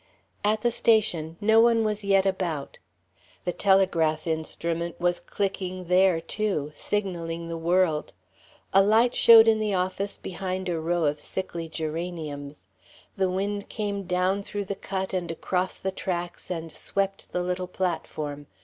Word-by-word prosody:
At 215 +1 +2
the 240 +1 +2
station, 180 -9 +2
no 220 +2 +5
one 230 -1 +5
was 215 -1 -1
yet 195 -1 +3
about. 175 -7 -2 0.7
The 180 - +1
telegraph 170 -6 +2
instrument 165 +1 -2
was 175 0 +1
clicking 185 -2 -3
there, 180 -2 +4
too, 175 -5 -2
signaling 170 -3 -3
the 165 - -3
world; 170 -2 +1 0.6
a 195 - +7
light 225 +5 +4
showed 225 -1 +8
in 220 -1 +4
the 210 -2 0
office 185 +2 -2
behind 185 0 -4
a 170 -2 -1
row 170 +1 0
of 145 0 0
sickly 170 0 -4
geraniums; 155 -3 -5 0.5
the 190 -1 +1
wind 200 +2 -2
came 205 -2 -2
down 185 +2 +1
through 205 0 -4
the 200 - -3
cut 190 -1 -4
and 180 -2 -2
across 180 +3 -2
the 190 - -3
tracks 175 -2 -4
and 165 -2 -4
swept 195 +4 -3
the 180 - -1
little 180 0 -2
platform. 155 -5 -3
185 Hz, 150 wpm, -26 LUFS, 165-200 Hz, 0.7 s, showed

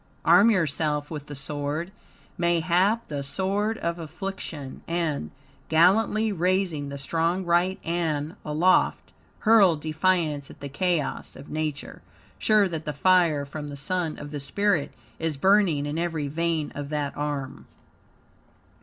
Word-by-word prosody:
Arm 220 +3 +7
yourself 150 -6 0
with 150 -2 -6
the 145 - -7
sword 145 +5 -3 0.4
mayhap 175 +6 +2
the 145 -2 -4
sword 195 +9 0
of 170 +1 -3
affliction 160 -4 -6
and, 165 - -1 0.4
gallantly 210 +6 +4
raising 180 -5 0
the 140 - -6
strong 165 +6 -1
right 175 +2 +2
ann 165 -1 -1
aloft, 160 +5 +2 0.3
hurl 215 -6 +6
defiance 155 -1 0
at - - -13
the 140 - -6
chaos 170 +1 -1
of - - -11
Nature, 155 -2 -4 0.4
sure 215 -2 +4
that 160 -3 -5
the 150 - -3
fire 170 -6 +3
from 150 +1 -7
the 145 - -7
Sun 165 +3 -2
of 145 0 -8
the 145 - -4
spirit 185 +3 0 0.3
is 160 -3 -2
burning 190 -4 +3
in 150 +2 -3
every 165 -4 -2
vein 160 0 -1
of 145 0 -6
that 145 -2 -2
arm. 140 -2 -4
160 Hz, 135 wpm, -26 LUFS, 145-185 Hz, 0.4 s, Arm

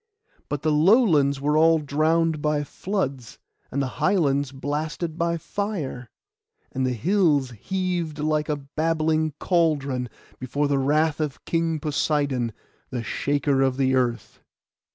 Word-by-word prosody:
But 145 0 -3
the 155 - +2
lowlands 155 - +4
were 150 +2 +1
all 165 +1 +5
drowned 155 +2 +1
by 150 -1 +1
floods, 140 - -4 0.3
and 140 +1 0
the 130 - -6
highlands 145 -8 +2
blasted 150 +4 -3
by 170 0 0
fire, 165 - -4 0.6
and 130 -1 -1
the 125 - 0
hills 150 - +2
heaved 175 - -3
like 155 0 0
a 150 - +1
babbling 155 +2 0
cauldron, 140 -8 +1 0.3
before 140 +3 -1
the 140 -1 +1
wrath 150 +3 +2
of 150 -3 -4
King 165 -1 0
Poseidon, 145 -5 0 0.4
the 125 -3 -4
shaker 140 +4 0
of 130 -1 +1
the 130 -1 +2
earth. 120 -4 -1
150 Hz, 130 wpm, -24 LUFS, 135-160 Hz, 0.6 s, all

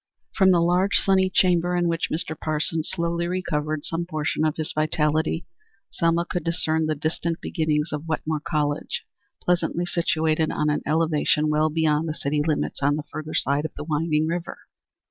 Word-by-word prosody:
From 190 -2 +4
the 175 -2 +5
large, 180 +3 +2
sunny 190 -1 +3
chamber 180 -1 +2
in 175 -1 +2
which 165 0 -1
Mr. 160 0 -2
Parsons 155 +1 -1
slowly 170 0 -1
recovered 155 -4 -2
some 170 +1 -2
portion 155 -2 -1
of 155 -1 +1
his 155 -1 -2
vitality, 155 +1 0 0.5
Selma 170 0 +1
could 175 -2 -3
discern 160 -1 0
the 155 - 0
distant 160 +3 -2
beginnings 155 -2 -1
of 150 +2 -4
Wetmore 155 -1 -2
College, 145 -1 -1 0.4
pleasantly 175 0 +1
situated 160 -2 +1
on 150 0 +1
an 150 - -1
elevation 155 -1 +2
well 155 +1 +2
beyond 155 0 +1
the 155 - -3
city 145 0 -1
limits 155 -2 -1
on 145 +1 +3
the 150 - -3
further 155 +1 -5
side 140 +2 +1
of 160 - -5
the - - -5
winding 155 0 0
river. 170 +1 -3
160 Hz, 170 wpm, -24 LUFS, 150-170 Hz, 0.5 s, the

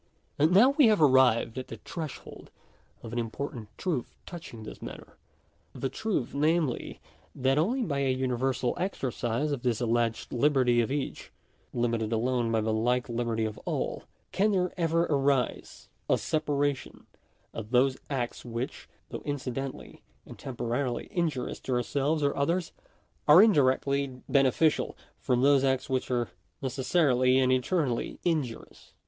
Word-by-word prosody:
§6. 145 - +5
And 160 - +3
now 235 +8 +7
we 280 -3 +5
have 215 -2 +4
arrived 130 -5 +4
at 130 - -7
the 115 - -8
threshold 155 +6 -8 0.5
of 115 - -8
an 120 - -1
important 115 0 -5
truth 165 -10 -3
touching 160 -11 -9
this - - -9
matter; - - -9 0.6
the 135 - -3
truth 215 - -2
namely, 155 -2 0 0.4
that 135 +2 +2
onlyjby 165 - 0
a - - +3
universal 130 -1 0
exercise 140 - -2
of 140 -4 -2
this 120 -3 0
alleged 115 -1 0
liberty 125 -2 +3
of 115 - -2
each, 145 -1 -4 0.4
limited 115 -2 -1
alone 120 +1 0
by 110 -1 +2
the 110 0 0
like 120 +3 +1
liberty 115 -1 -1
of 110 -1 -5
all, - - -3 0.3
can 210 +2 +2
there 180 -2 0
ever 165 -1 +1
arise 140 -4 0 0.2
a - - +4
separation 145 -3 -2 0.5
of 110 -1 -6
those 130 +2 +3
acts 125 -4 -3
which, 120 +1 -5 0.2
though - - -6
incidentally 135 -2 -5 0.2
and - - -12
temporarily 120 0 -3
injurious 155 -8 -2
to 130 - -3
ourselves 140 +6 0
or 140 - +1
others, 170 +5 0 0.6
are 150 +4 +9
indirectly 140 -6 +3 0.2
beneficial, 140 +3 +2 0.2
from 125 0 +1
those 140 -1 +5
acts 130 -1 +1
j - - -2
which 130 - -1
are 120 -5 -1 0.3
necessarily 130 -1 +2
and 130 -1 +3
eternally 130 -1 0
injurious. 150 -9 -3
130 Hz, 145 wpm, -28 LUFS, 120-150 Hz, 0.6 s, are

